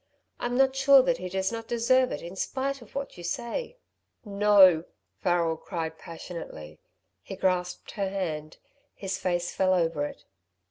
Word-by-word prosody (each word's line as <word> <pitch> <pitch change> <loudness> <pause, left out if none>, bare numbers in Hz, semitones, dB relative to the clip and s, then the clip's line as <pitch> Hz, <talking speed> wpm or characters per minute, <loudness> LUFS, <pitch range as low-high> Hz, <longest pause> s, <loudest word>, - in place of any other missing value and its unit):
I'm 245 +1 -1
not 265 0 +4
sure 270 0 +7
that 255 -1 +1
he 185 - -5
does 190 +2 -1
not 225 -1 -6
deserve 255 +2 +3
it - - -5
in 175 +2 -8
spite 270 +6 -2
of 235 - -16
what 275 -8 -5
you - - -8
say." 240 - -4 0.5
"No!" 200 -5 +5 0.3
Farrel 170 -3 +1
cried, 160 -2 -5
passionately. 165 - -9 0.4
He 195 - -8
grasped 180 -1 -1
her 195 -2 -2
hand. 155 -6 -4 0.4
His 195 -1 -4
face 175 -1 -1
fell 185 -1 +3
over 165 -4 0
it. - - -13
190 Hz, 155 wpm, -27 LUFS, 175-240 Hz, 0.5 s, sure